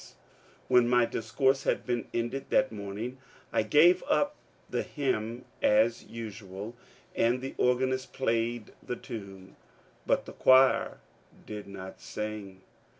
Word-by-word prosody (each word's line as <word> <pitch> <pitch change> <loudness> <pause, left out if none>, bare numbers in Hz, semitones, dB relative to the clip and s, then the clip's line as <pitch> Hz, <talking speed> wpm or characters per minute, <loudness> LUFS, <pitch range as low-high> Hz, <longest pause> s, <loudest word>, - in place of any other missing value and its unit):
When 120 -1 +5
my 120 -1 +5
discourse 130 +4 +1
had - - 0 0.3
ended 120 +4 -3
that 130 - +3
morning 105 +5 -5 0.3
I - - +3
gave 160 +11 +5
out 290 0 +2 0.3
the - - -1
hymn 120 -4 -2 0.2
as 110 +2 +3
usual, 105 -1 -7 0.4
and 120 +2 +2
the 135 +1 -6
organist 130 +1 +1
played 115 -2 -1
the 125 - -4
tune, 100 -7 -9 0.5
but - - +2
the - - -9
choir 130 0 +5 0.5
did 105 -2 -7
not 95 -1 -9
sing. 105 -3 -6
115 Hz, 120 wpm, -29 LUFS, 105-130 Hz, 0.5 s, When